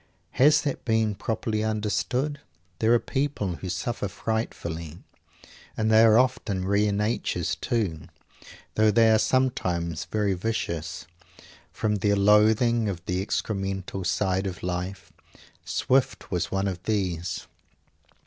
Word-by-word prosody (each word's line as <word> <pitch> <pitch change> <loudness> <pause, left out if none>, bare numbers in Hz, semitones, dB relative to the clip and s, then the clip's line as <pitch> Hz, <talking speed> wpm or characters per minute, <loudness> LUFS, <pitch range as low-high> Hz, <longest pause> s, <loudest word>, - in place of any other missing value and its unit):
Has 150 +4 +4
that 145 - -3
been 110 -2 +1
properly 110 +1 -2
understood? 110 +7 -1 0.4
There 110 - +3
are 120 - +7
people 125 -10 -2
who 95 - -6
suffer 100 +4 -2
frightfully 85 -7 -4 0.8
and 110 0 +1
they 110 0 +7
are 110 -1 +6
often 115 -7 +1
rare 100 +2 +2
natures, 100 -5 -1
too, 105 - -2 0.7
though 110 0 +4
they 110 +1 +5
are 110 - +5
sometimes 90 -12 0
very 105 -2 0
vicious 90 -4 -3 0.7
from 105 -1 -1
their 100 +1 +2
loathing 105 +3 +4
of 90 -4 -6
the 90 +1 -1
excremental 95 -2 -3
side 95 +2 0
of 95 -1 -7
life. 90 +2 -4 0.5
Swift 130 0 0
was 90 -3 -1
one 95 0 0
of 90 -2 -4
these. 90 -7 -2
105 Hz, 125 wpm, -26 LUFS, 90-110 Hz, 0.8 s, are